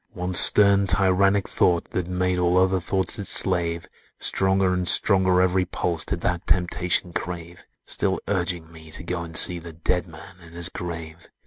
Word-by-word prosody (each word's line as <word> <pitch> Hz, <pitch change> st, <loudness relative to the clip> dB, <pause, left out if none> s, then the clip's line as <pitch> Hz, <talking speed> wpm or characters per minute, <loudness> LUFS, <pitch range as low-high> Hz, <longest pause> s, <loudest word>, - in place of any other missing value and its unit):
"One 90 Hz, +1 st, -6 dB
stern, 100 Hz, +2 st, +6 dB
tyrannic 95 Hz, +2 st, +2 dB
thought, 85 Hz, -2 st, -1 dB
that 90 Hz, -2 st, -4 dB
made 90 Hz, 0 st, -2 dB
All 90 Hz, 0 st, 0 dB
other 95 Hz, 0 st, +1 dB
thoughts 95 Hz, +4 st, -1 dB
its 100 Hz, -, -4 dB
slave; 85 Hz, -3 st, 0 dB, 0.3 s
Stronger 95 Hz, -1 st, 0 dB
and 90 Hz, -1 st, -3 dB
stronger 95 Hz, -1 st, +3 dB
every 95 Hz, 0 st, 0 dB
pulse 85 Hz, -2 st, -3 dB
Did -, -, -5 dB
that 90 Hz, -1 st, -4 dB
temptation 90 Hz, -1 st, -1 dB
crave,— 85 Hz, 0 st, -8 dB, 0.2 s
Still 95 Hz, -1 st, -2 dB
urging 90 Hz, -4 st, -3 dB
me 80 Hz, -1 st, -15 dB
to 80 Hz, -, +2 dB
go 85 Hz, 0 st, -5 dB
and 85 Hz, -1 st, -2 dB
see 90 Hz, +1 st, +7 dB
The 85 Hz, 0 st, -12 dB
Dead 90 Hz, +2 st, -3 dB
Man 80 Hz, +2 st, -15 dB
in 85 Hz, -1 st, -16 dB
his 85 Hz, +1 st, -4 dB
grave! 85 Hz, -3 st, -9 dB
90 Hz, 175 wpm, -22 LUFS, 85-95 Hz, 0.3 s, see